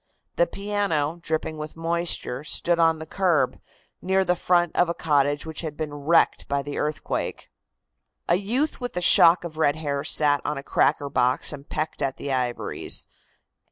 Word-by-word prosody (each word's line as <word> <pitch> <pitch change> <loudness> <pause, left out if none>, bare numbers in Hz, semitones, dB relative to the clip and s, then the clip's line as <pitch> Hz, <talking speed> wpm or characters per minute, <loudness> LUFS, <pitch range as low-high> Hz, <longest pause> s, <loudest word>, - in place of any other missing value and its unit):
The - - +3
piano, 195 - -2
dripping 155 -1 -3
with 150 0 -7
moisture, 165 -5 -2
stood 170 +3 +1
on 165 -1 +4
the 160 - -8
curb, 180 -3 +1 0.4
near 190 +1 +1
the 180 - +2
front 175 -1 +1
of 175 - +3
a 170 - -2
cottage 145 -1 +1
which 160 -1 -5
had 155 -3 -6
been 150 -2 -4
wrecked 145 +4 +2
by 140 0 -1
the 145 0 -5
earthquake. 150 +1 -3 0.8
A - - +3
youth 250 +10 -1
with 245 -7 -5
a - - 0
shock 170 0 +6
of 160 -2 -8
red 145 -2 +3
hair 145 -3 -3
sat 145 -2 +3
on 150 0 -2
a 140 - -6
cracker 145 0 +1
box 125 +2 +1
and 140 0 -10
pecked 155 -1 -3
at 135 -2 -1
the 140 - -3
ivories. 125 -2 -1
155 Hz, 175 wpm, -24 LUFS, 145-175 Hz, 0.8 s, shock